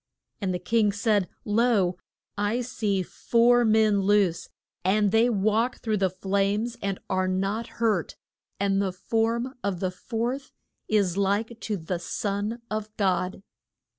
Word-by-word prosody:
And 190 -2 0
the 180 - -1
king 210 +4 +2
said, 205 -2 +1 0.2
Lo, 210 -4 +2 0.4
I 205 +4 0
see 210 -6 -1
four 240 +5 +3
men 215 -2 +4
loose, 195 -3 +2 0.3
and 200 +2 +3
they 225 +2 +4
walk 220 +3 +1
through 220 -2 -1
the 190 -1 +2
flames 200 +5 0
and 195 -1 -1
are 185 0 0
not 195 +5 -1
hurt, 215 -7 0 0.4
and 195 0 +2
the 195 -2 0
form 230 +6 -1
of 195 -3 -1
the 185 0 -1
fourth 240 +7 -3 0.4
is 200 -4 +1
like 205 +4 0
to 215 -3 -3
the 170 +1 -3
son 205 +6 -3
of 215 -1 -3
God. 190 -1 0
205 Hz, 140 wpm, -26 LUFS, 190-225 Hz, 0.4 s, men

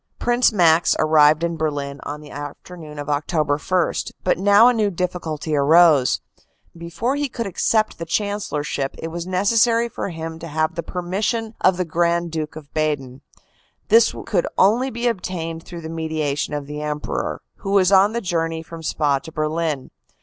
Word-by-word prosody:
"Prince 240 +1 +2
Max 170 -5 +4
arrived 155 0 +4
in 170 -1 -1
Berlin 145 -3 -3
on 150 +1 -6
the 150 - -12
afternoon 150 +2 -9
of 145 - -5
Oct. 145 +4 -2
1, 160 +5 -1
but 180 - +1
now 205 +4 +6
a 250 - +5
new 215 -3 +1
difficulty 165 -4 -3
arose. 150 -1 +5 0.5
Before 170 +10 -3
he 290 -1 -1
could 230 -1 -4
accept 215 +3 0
the 165 - -4
Chancellorship 165 -8 -2
it 165 - -5
was 170 +1 -5
necessary 230 +5 +2
for 230 - -5
him 165 -1 -6
to 165 - -7
have 155 +2 -1
the 170 - -3
permission 205 +7 -2
of 185 -1 +4
the 180 - -1
Grand 170 +1 0
Duke 155 -2 -4
of 150 -2 -11
Baden. 145 -4 -2 0.7
This 460 +1 +5
could - - 0
only 235 +7 +3
be 235 0 -4
obtained 170 -7 -3
through 170 -2 -8
the 160 - -7
mediation 155 -3 -2
of 145 -1 -4
the 150 +1 -6
Emperor, 150 0 -3
who 195 - -6
was 195 -1 +4
on 200 +2 +5
the 235 - -2
journey 165 -4 -2
from 165 0 -10
Spa 145 -3 0
to 160 +3 -11
Berlin. 155 -2 -2
165 Hz, 170 wpm, -21 LUFS, 150-195 Hz, 0.7 s, now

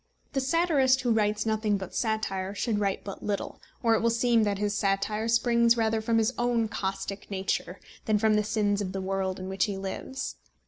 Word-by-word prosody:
The 275 - +1
satirist 270 -3 +3
who 245 -2 +1
writes 210 -1 +1
nothing 215 -2 +1
but 190 -2 -7
satire 200 -4 -1
should 215 -1 0
write 200 -2 -1
but 195 - -7
little, 205 -1 -3 0.2
or 230 -1 +4
it 220 - +2
will 230 - +3
seem 230 0 +3
that 200 -1 0
his 205 0 -1
satire 205 +2 0
springs 235 0 +3
rather 225 -1 +1
from 225 +1 +1
his 225 +2 +2
own 240 -2 +1
caustic 195 0 -4
nature 195 -1 -2 0.3
than 215 -2 +3
from 215 +1 +3
the 210 0 +3
sins 205 -1 0
of 185 -2 -3
the 195 - -2
world 190 0 -2
in 185 - -6
which 190 -1 +1
he 200 -2 -4
lives. 195 - -5
215 Hz, 200 wpm, -28 LUFS, 195-230 Hz, 0.3 s, or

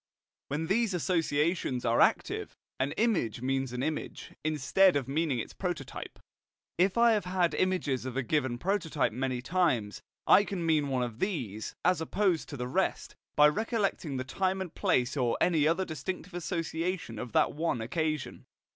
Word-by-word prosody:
When 150 +3 -2
these 205 +2 +1
associations 165 -5 0
are 115 +1 +3
active, - - +1 0.2
an 135 +2 0
image 175 - 0
means 135 -1 0
an 125 +1 -3
image, 155 0 -4
instead 155 +5 +3
of 135 -3 0
meaning 145 -1 0
its 115 - -5
prototype. 175 -8 -5 0.6
If 185 +4 +3
I 235 0 +6
have 210 -5 +1
had 180 -2 +1
images 180 -9 0
of 130 0 -5
a 135 - +1
given 130 -2 0
prototype 165 - 0
many 125 +1 -2
times, 130 - 0 0.2
I 200 - +7
can 190 -4 -4
mean 155 -3 +2
one 130 -2 0
of 120 -1 -5
these, 125 - -3
as 180 -2 +3
opposed 180 0 0
to 145 - -6
the 125 0 -3
rest, 125 - -1 0.2
by 150 - +7
recollecting 200 - -1
the 130 - -2
time 190 +8 -1
and 185 -3 -5
place 140 -10 +1
or 125 -4 +1
any 160 -4 +3
other 170 +4 +1
distinctive 180 +2 -5
association 165 - -3
of 125 -1 -6
that - - +3
one 160 -4 -1
occasion. 155 +5 -3
155 Hz, 165 wpm, -30 LUFS, 130-185 Hz, 0.6 s, I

